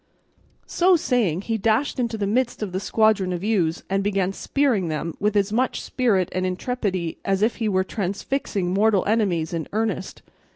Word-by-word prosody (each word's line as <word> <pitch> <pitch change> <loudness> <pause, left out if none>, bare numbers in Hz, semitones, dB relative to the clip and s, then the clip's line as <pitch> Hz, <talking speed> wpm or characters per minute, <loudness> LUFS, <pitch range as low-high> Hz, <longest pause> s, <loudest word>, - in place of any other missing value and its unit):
So 365 +1 +3
saying, 230 - +1
he 225 0 -2
dashed 225 +7 +1
into 235 -2 -1
the 205 - -1
midst 235 +2 0
of 200 - -4
the 185 - -2
squadron 210 -2 +2
of 175 0 -3
ewes, 185 -7 0
and 195 +1 0
began 195 -2 0
spearing 245 -7 0
them 155 +1 -3
with 210 +1 0
as 205 0 +1
much 255 +3 +1
spirit 210 -8 +1
and 185 - -2
intrepidity 185 -3 -2
as 195 +1 +1
if 225 - +1
he 225 -2 0
were 190 -1 +2
transfixing 195 0 -2
mortal 205 0 +3
enemies 195 -7 +1
in 165 -2 -3
earnest. 215 -3 -2
200 Hz, 175 wpm, -23 LUFS, 185-225 Hz, -, So